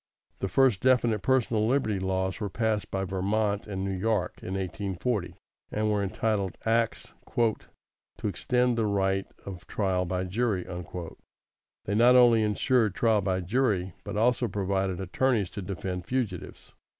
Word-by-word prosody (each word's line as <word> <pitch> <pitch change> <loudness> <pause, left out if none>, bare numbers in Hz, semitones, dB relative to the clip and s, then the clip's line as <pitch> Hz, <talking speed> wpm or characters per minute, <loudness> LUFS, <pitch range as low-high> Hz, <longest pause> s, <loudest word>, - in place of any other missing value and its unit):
The - - -1
first 130 -2 +3
definite 120 -5 +3
personal 115 -4 +2
liberty 115 -6 +1
laws 95 0 -1
were 105 -2 -2
passed 110 0 -1
by 95 0 -2
Vermont 100 +3 -1
and 95 -2 -3
New 95 -1 -2
York, 100 -1 -1
in 95 - -4
1840, 95 +2 -2 0.4
and 110 0 0
were 105 -1 +1
entitled 100 -1 -1
Acts 115 0 0 0.2
"to 115 -2 +1 0.6
extend 125 +5 +1
the 110 - +1
right 95 -1 0 0.2
of 95 -3 -8
trial 95 -3 0
by 90 +1 -2
jury." 100 0 -1 1.2
They 100 - -2
not 120 +4 +6
only 120 -3 +6
insured 110 0 +2
jury 110 -3 +3
trial, 95 +1 0
but - - -5
also 120 +2 +2
provided 95 -2 -1
attorneys 100 +1 0
to 105 - -6
defend 90 -1 -5
fugitives. 115 -9 -4
105 Hz, 140 wpm, -28 LUFS, 95-115 Hz, 1.2 s, not